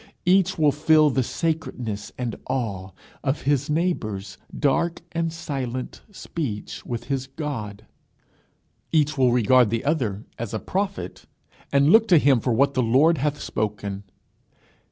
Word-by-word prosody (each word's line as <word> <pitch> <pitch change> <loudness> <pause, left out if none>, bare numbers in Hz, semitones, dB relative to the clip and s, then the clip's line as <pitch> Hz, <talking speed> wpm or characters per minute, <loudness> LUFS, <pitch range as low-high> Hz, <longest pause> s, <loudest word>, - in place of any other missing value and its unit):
Each 190 +1 +3
will 150 -2 +4
feel 155 +1 +4
the 130 - +1
sacredness 125 -8 -3
and 120 -3 -3
awe 100 -8 -2 0.3
of 140 +1 -1
his 145 +1 +1
neighbour's 110 - -2 0.2
dark 165 +4 +1
and 165 -1 -1
silent 130 -6 -5
speech 140 - -5
with 120 -1 -4
his 135 +1 -3
God. 130 -9 -6 1.1
Each 155 -2 +2
will 130 -3 +3
regard 125 0 +4
the 115 +4 -2
other 120 -10 -1
as 115 -1 -4
a - - -1
prophet, 195 - -4 0.4
and 140 +2 +4
look 225 +2 +6
to 180 - +6
him 140 -4 +4
for 125 - -1
what 140 +4 +3
the 130 - +1
Lord 135 +7 +4
hath 150 +1 -1
spoken. 100 -2 -3
135 Hz, 140 wpm, -24 LUFS, 115-155 Hz, 1.1 s, look